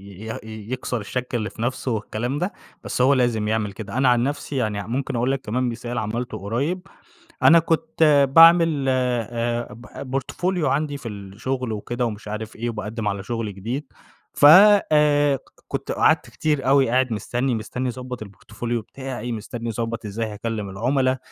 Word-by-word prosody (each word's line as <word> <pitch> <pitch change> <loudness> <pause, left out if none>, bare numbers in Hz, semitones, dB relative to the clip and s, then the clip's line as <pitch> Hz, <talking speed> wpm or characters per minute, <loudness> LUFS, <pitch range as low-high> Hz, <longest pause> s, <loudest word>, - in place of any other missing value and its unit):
ي 100 +1 -11
يه 115 - -5 0.3
يكسر 125 -2 -2
الشَك 125 +4 -4
اللي 110 -2 -1
في 115 - -8
نفسه 125 +1 -2
والكلام 115 +5 -3
ده، 180 +5 -2 0.3
بس - - -1
هو 135 +2 +5
لازم 120 -5 +1
يعمل 110 -2 0
كده. 110 +2 -7
أنا 130 -1 +3
عن 120 -1 +4
نفسي 145 +1 -3
يعني 110 -5 -1
عم 100 +3 -5
ممكن 130 -1 -2
أقول 120 +3 +1
لِك 135 - -2
كمان 125 +2 -1
مثال 120 +1 -4
عملته 120 +3 -3
قريب، 140 - -2 0.6
أنا 170 0 +8
كنت 160 -3 +3
باعمل 165 -4 +7
آآ 120 -2 -1 0.3
ب 135 0 -1
portfolio 180 +4 -2
عندي 145 0 0
في 125 -4 -7
الشغل 110 +5 -4
وكده 120 +4 -3
ومش 105 -1 -6
عارف 110 +1 -5
إيه، 120 +1 -2
وباقدّم 105 0 -4
على 100 -1 -2
شغل 115 -1 -4
جديد، 120 +9 -4 0.5
ف - - 0 0.5
آآ، 145 -2 +4
ك - - -13 0.3
كنت - - -3
قعدت - - +2
كتير 150 -4 -1
أوي 135 -2 +5
قاعد 130 -1 +2
مستني 120 +4 -1
مستني 120 +4 -3
أضبّط 125 -2 -6
الportfolio 115 +4 -5
بتاعي، 130 -1 -6
مستني 115 +2 -5
أضّبط 115 +1 -3
إزاي 110 +3 -3
هاكلّم 105 -1 -4
العُملا، 130 +5 +1
120 Hz, 170 wpm, -23 LUFS, 110-135 Hz, 0.6 s, أنا